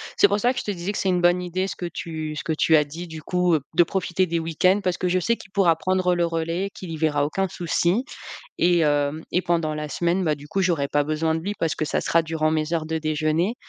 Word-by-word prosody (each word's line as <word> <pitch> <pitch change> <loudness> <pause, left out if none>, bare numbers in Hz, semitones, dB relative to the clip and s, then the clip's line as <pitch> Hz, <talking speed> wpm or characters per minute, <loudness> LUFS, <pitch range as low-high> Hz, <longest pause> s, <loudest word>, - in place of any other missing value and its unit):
C'est 200 - +5
pour 205 +1 +1
ça 245 +3 +2
que 250 - -3
je - - -5
te 210 - -2
disais 185 +1 -4
que - - -4
c'est 195 - 0
une 180 -1 +2
bonne 175 +1 +3
idée 180 +2 -2
ce - - -5
que 175 - -4
tu 155 -2 -5
ce - - -4
que 160 - 0
tu 160 +1 +4
as 150 - +3
dit, 165 +5 -7
du 160 -2 -9
coup, 180 +1 +1
heu, - - +2 0.2
de 175 - +6
profiter 185 +1 0
des 170 0 -1
week-ends 165 +4 +2
parce 180 -2 -1
que 180 - -1
je 185 +1 +2
sais 235 +6 +1
qu'il 195 - -15
pourra 190 -4 +3
prendre 185 +1 +1
le 175 -1 +2
relais, 165 +3 -2
qu'il 180 -3 -8
y 160 - -4
verra 150 -2 +1
aucun 190 +6 -1
souci 175 +7 0 0.5
et 175 0 +4
hem, 145 0 +1
et 180 - +3
pendant 165 -4 0
la 150 0 -4
semaine, 175 +4 0
bah, 155 -4 +1
du 145 0 -13
coup, 195 - -1
j'aurais 170 -7 +1
pas 145 +1 +2
besoin 155 +2 0
de 160 - -2
lui 200 +5 -3
parce 165 - 0
que 155 - -2
ça - - -1
sera 165 - +3
durant 160 -1 -1
mes 155 +1 0
heures 160 -2 -1
de 160 0 -2
déjeuner. 155 +5 0
170 Hz, 280 wpm, -23 LUFS, 155-180 Hz, 0.5 s, de